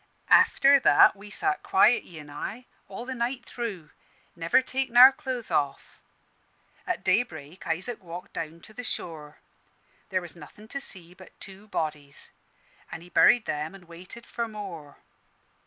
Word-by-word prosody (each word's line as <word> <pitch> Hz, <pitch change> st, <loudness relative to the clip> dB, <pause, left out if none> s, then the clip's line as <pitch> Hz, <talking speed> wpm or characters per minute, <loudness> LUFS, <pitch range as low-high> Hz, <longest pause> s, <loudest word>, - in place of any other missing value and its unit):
"After 280 Hz, +1 st, +6 dB
that -, -, +6 dB
we 200 Hz, +1 st, -13 dB
sat 380 Hz, -, 0 dB
quiet, 215 Hz, +5 st, +4 dB
he 165 Hz, -3 st, -11 dB
an' 150 Hz, -1 st, -12 dB
I, 215 Hz, +11 st, -6 dB, 0.2 s
all 200 Hz, +5 st, -8 dB
the 260 Hz, -, -4 dB
night 245 Hz, +1 st, -3 dB
through, 200 Hz, -11 st, -6 dB, 0.4 s
never 170 Hz, +9 st, +2 dB
takin' 260 Hz, -2 st, -2 dB
our 255 Hz, +2 st, +11 dB
clothes 255 Hz, -3 st, -6 dB
off. 140 Hz, -1 st, -2 dB, 0.9 s
An' -, -, +2 dB
at -, -, -12 dB
daybreak 160 Hz, -7 st, -1 dB
Isaac 185 Hz, +9 st, -3 dB
walked 175 Hz, +1 st, -9 dB
down 165 Hz, +1 st, -6 dB
to 215 Hz, -, -15 dB
the 250 Hz, -, -7 dB
shore. 155 Hz, -8 st, -6 dB, 0.7 s
There 190 Hz, -2 st, 0 dB
was 175 Hz, -2 st, -7 dB
nothin' 170 Hz, +7 st, -14 dB
to 275 Hz, -, -4 dB
see 175 Hz, -8 st, -3 dB
but 185 Hz, 0 st, -17 dB
two 195 Hz, +2 st, -12 dB
bodies, 150 Hz, -7 st, -5 dB, 0.6 s
an' 165 Hz, -, -7 dB
he 175 Hz, -, -14 dB
buried 235 Hz, +5 st, +5 dB
them 150 Hz, +4 st, -4 dB
an' 185 Hz, -2 st, -15 dB
waited 180 Hz, +7 st, -12 dB
for 235 Hz, -1 st, -4 dB
more. 185 Hz, -9 st, -9 dB
190 Hz, 160 wpm, -27 LUFS, 165-240 Hz, 0.9 s, our